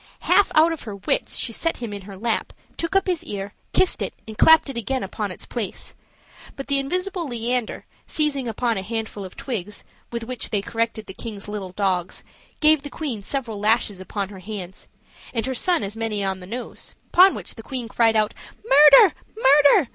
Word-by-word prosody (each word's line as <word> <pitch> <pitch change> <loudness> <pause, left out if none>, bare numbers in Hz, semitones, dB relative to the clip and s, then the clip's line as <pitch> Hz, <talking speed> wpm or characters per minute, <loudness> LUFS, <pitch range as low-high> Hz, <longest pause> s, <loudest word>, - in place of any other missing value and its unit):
Half 405 - +4
out 320 +2 +5
of 325 - -7
her 210 -4 -7
wits, 200 - 0
she 230 - 0
set 330 +8 -1
him 235 -4 -6
in 200 - -6
her 195 0 -10
lap, 225 +2 -2 0.2
took 335 +3 -3
up 390 - +4
his 360 -4 -1
ear, 200 0 -6 0.2
kissed 375 - +2
it, - - -3
and 220 - -8
clapped 320 +8 +6
it 275 - -6
again 255 +3 -2
upon 205 +2 -4
its 185 - -9
place; 225 -6 -5 0.6
but 275 - -6
the 280 -1 +1
invisible 360 +4 -2
Leander, 240 -1 -2 0.2
seizing 285 -4 0
upon 230 -1 -1
a - - -4
handful 220 0 -4
of 185 - -9
twigs, 210 -5 -5 0.3
with 235 -1 -3
which 250 +1 -3
they 205 -3 -1
corrected 225 -1 -2
the 190 - -9
king's 210 -1 -7
little 205 -3 -5
dogs, 185 -3 -1 0.4
gave 310 -1 +5
the 285 - -7
queen 270 -11 -4
several 230 -2 -3
lashes 210 -2 +1
upon 195 +1 -4
her 195 -2 -10
hands, 190 -2 -8 0.5
and 225 -1 0
her 265 - -2
son 350 - +1
as 200 +2 -5
many 225 -3 -2
on 190 -1 -2
the 180 - -10
nose: 240 +5 -7 0.2
upon 370 +2 +7
which - - -5
the 225 - -10
queen 250 0 -5
cried 225 -1 +2
out, 215 -1 +2 0.3
"Murder! 295 +5 +8 0.2
murder!" 285 - +5
230 Hz, 200 wpm, -23 LUFS, 205-280 Hz, 0.6 s, Murder